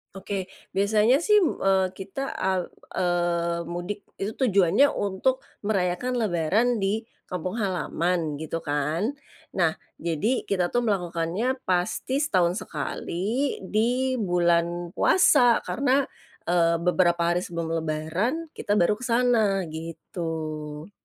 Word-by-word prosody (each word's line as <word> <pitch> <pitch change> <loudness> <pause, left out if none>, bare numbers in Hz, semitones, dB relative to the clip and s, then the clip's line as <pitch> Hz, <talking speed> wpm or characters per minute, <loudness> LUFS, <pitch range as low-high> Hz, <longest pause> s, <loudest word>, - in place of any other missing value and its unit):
Oke. 195 -1 -4 0.2
Biasanya 215 - +3
sih, 420 0 +5
m 355 - +3 0.2
eee, 190 -1 +3
kita 195 +8 -6
a 190 - 0 0.5
eee, 170 -1 0
mudik 175 +4 -5 0.2
itu 210 +3 -3
tujuannya 205 +2 +4
untuk 205 +7 0 0.2
merayakan 195 +4 0
lebaran 200 +3 +2 0.2
di 215 +4 0 0.3
kampung 180 +3 -3
halaman, 180 -6 -1
gitu 160 +2 -4
kan. 155 - -1 0.4
Nah, 170 -4 +3 0.2
jadi, 170 - -1
kita 185 -3 0
tuh 240 +6 0
melakukannya 185 +4 0
pasti 185 +9 0
setahun 185 - +2
sekali, 215 +8 -2
di 250 +5 +1
bulan 175 -2 +1
puasa. 245 - +4
Karena, 275 +1 +2 0.4
eee, 170 -1 +3
beberapa 175 -1 +3
hari 175 - +2
sebelum 170 -2 -4
lebaran, 175 - -2
kita 205 - -1
baru 210 +3 +2
ke 255 - -5
sana, 230 -5 +3
gitu. 160 0 -5
185 Hz, 115 wpm, -26 LUFS, 170-225 Hz, 0.5 s, sih